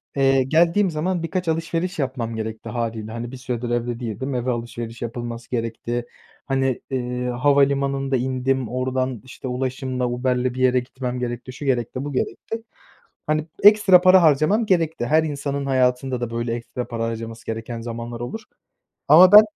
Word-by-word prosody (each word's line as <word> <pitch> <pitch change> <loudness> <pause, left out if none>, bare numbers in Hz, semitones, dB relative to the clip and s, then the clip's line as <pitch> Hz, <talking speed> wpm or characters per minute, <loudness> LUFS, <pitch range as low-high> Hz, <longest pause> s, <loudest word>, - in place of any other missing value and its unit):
eee, 135 -1 +4
geldiğim 170 +8 +3
zaman 165 +2 -1
birkaç 180 +1 -2
alışveriş 165 +2 -1
yapmam 125 -4 -2
gerekti 110 0 -5
hâliyle. 115 -2 -3
Hani, 115 +1 -5
bir 130 - -8
süredir 125 -2 -4
evde 120 0 -1
değildim, 125 +3 -4
eve 125 +1 0
alışveriş 120 -1 -5
yapılması 120 0 -5
gerekti. 120 0 -3 0.4
Hani, 135 -2 0
eee, 125 -1 -2
havalimanında 140 +1 +2
indim, 130 -1 -1
oradan, 130 -1 -2
işte, 130 0 -8
ulaşımla, 130 0 -2
Uber'le 125 0 0
bir 125 -1 -1
yere 130 0 +4
gitmem 125 0 -5
gerekti, 120 +1 -4
şu 145 - -8
gerekti, 125 -1 -1
bu 145 - -5
gerekti. 225 - -3 0.6
Hani, 155 +1 0 0.2
ekstra 205 -3 +7
para 185 0 +7
harcamam 160 +9 +3
gerekti, 165 - +1
her 155 +4 +4
insanın 140 -2 -3
hayatında 125 -1 +1
da 120 - -2
böyle 115 0 -2
ekstra 120 +1 -5
para 115 -2 -3
harcaması 115 0 -6
gereken 115 +1 -5
zamanlar 115 0 -6
olur. 125 - -5 0.7
Ama 180 +4 +9
ben, 210 +1 +12
130 Hz, 155 wpm, -22 LUFS, 120-140 Hz, 0.7 s, ben